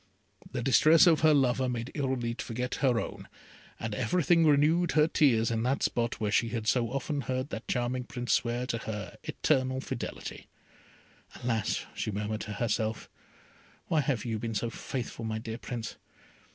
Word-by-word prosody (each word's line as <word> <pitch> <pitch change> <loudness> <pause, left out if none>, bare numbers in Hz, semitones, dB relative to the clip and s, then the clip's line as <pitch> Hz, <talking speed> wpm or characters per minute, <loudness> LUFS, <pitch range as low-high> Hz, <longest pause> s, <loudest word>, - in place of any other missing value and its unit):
The - - -3
distresses 155 +6 +6
of 165 -3 +5
her 155 0 +5
lover 130 -3 +3
made 120 +1 -3
Irolite 130 -5 -2
forget 125 +2 -3
her 125 -4 +3
own, - - -6 0.5
and 110 -1 -3
everything 170 +5 +3
renewed 155 +4 +4
her 150 0 +5
tears 120 -9 +3
in 115 -1 0
that 130 +4 0
spot 120 0 0
where 105 -2 -1
she 115 +1 +2
had 115 -2 -3
so 115 +1 +2
often 140 +3 -2
heard 130 +2 -2
that 110 - -6
charming 125 +1 -1
Prince 125 -1 -2
swear 120 +1 0
to 115 -2 -2
her 105 -5 -6
eternal 130 -3 +1
fidelity. - - -6 1.0
"Alas!" 115 -3 0
she - - -3
murmured 105 +1 -3
to 110 - -5
herself, 110 0 -2 0.8
"why 160 -3 +3
have 135 -5 -1
you 110 -2 -2
been 115 0 -4
so 115 +3 -1
faithful, 120 -1 -5
my 110 -1 -2
dear 110 0 -6
Prince? 115 -2 -5
120 Hz, 165 wpm, -29 LUFS, 115-135 Hz, 1.0 s, distresses